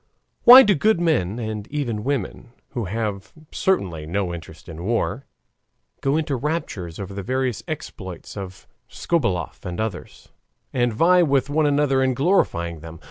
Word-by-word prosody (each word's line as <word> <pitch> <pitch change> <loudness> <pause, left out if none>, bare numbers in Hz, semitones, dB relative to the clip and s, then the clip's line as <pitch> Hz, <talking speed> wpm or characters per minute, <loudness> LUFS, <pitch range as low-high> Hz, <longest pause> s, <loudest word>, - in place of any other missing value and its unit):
Why 255 +2 +12
do 210 - +4
good 210 +4 +2
men 125 - +1
and 110 -2 -4
even 120 -8 -3
women, 125 -3 -3 0.2
who 120 -5 -4
have 105 0 -4 0.2
certainly 90 - -1
no 90 +1 -2
interest 80 -1 -10
in 80 0 -8
war, 120 +5 -1 0.7
go 140 +2 +1
into 155 -3 -1
raptures 120 - -4
over 100 0 -6
the 100 - -5
various 130 +2 -1
exploits 95 - -7
of 95 -2 -8 0.2
Skobeloff 120 - -2
and 90 +1 -5
others, 110 -4 -5 0.4
and 120 -2 +1
vie 175 +10 +4
with 140 -3 +1
one 155 0 +2
another 140 -2 +2
in 130 -1 +1
glorifying 85 - +1
them? 80 +1 -10
120 Hz, 150 wpm, -22 LUFS, 95-145 Hz, 0.7 s, Why